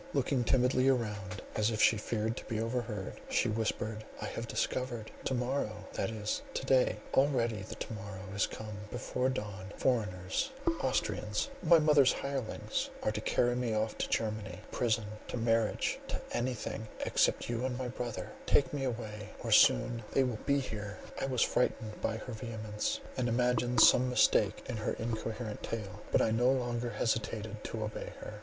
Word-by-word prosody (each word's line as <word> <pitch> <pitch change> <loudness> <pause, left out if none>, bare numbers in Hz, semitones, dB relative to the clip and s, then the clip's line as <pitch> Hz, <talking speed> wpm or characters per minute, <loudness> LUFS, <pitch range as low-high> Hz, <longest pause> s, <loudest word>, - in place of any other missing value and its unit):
Looking 135 -2 +2
timidly 130 +1 +3
around, 105 -5 -1
as 105 0 +3
if 110 -2 -2
she 115 - +6
feared 110 +1 -1
to - - -6
be 110 - -2
overheard, 115 -4 -3
she - - +2
whispered: 110 0 -1 0.2
"I - - -4
have 115 - -4
discovered—to 125 0 -2
morrow 120 -5 -1
—that 95 - -1
is, 110 -1 -2
to - - -2
day—already 125 -2 +2
the 95 - -7
to - - -5
morrow 100 -3 -7
is 100 - +2
come—before 110 +4 -3
dawn, 100 -6 -4
foreigners, 105 - 0 0.3
Austrians, - - 0
my 170 - +7
mother's 150 -4 +5
hirelings, 135 -5 -2
are - - +2
to 105 0 -3
carry 120 +2 +2
me 120 -3 0
off 110 0 0
to - - -1
Germany, 110 -2 -2
to - - -17
prison, 115 -3 +1 0.2
to - - -3
marriage—to 115 -1 0
anything, 120 -2 -2 0.2
except - - +2
you 120 +1 -1
and 130 -1 -1
my 130 0 -2
brother 120 -2 -4 0.2
—take 140 - +4
me 140 -2 -1
away, 105 -4 -4
or - - -2
soon 115 - +5
they 135 - +5
will 125 -4 -2
be 140 0 +4
here!" 105 -5 -5 0.2
I - - 0
was 130 -3 +2
frightened 110 -3 0
by 110 - 0
her 125 +2 -7
vehemence, 110 -2 -3 0.2
and 125 -2 +1
imagined 125 0 +3
some 125 +3 +7
mistake 105 -4 +3
in 125 - -3
her 110 - -1
incoherent 110 -1 -3
tale; 105 -2 -5
but - - +4
I 110 - +2
no 120 +3 +4
longer 120 -2 -1
hesitated 110 -1 -2
to 110 -1 -3
obey 105 0 -5
her. 105 - -7
115 Hz, 165 wpm, -32 LUFS, 105-125 Hz, 0.3 s, my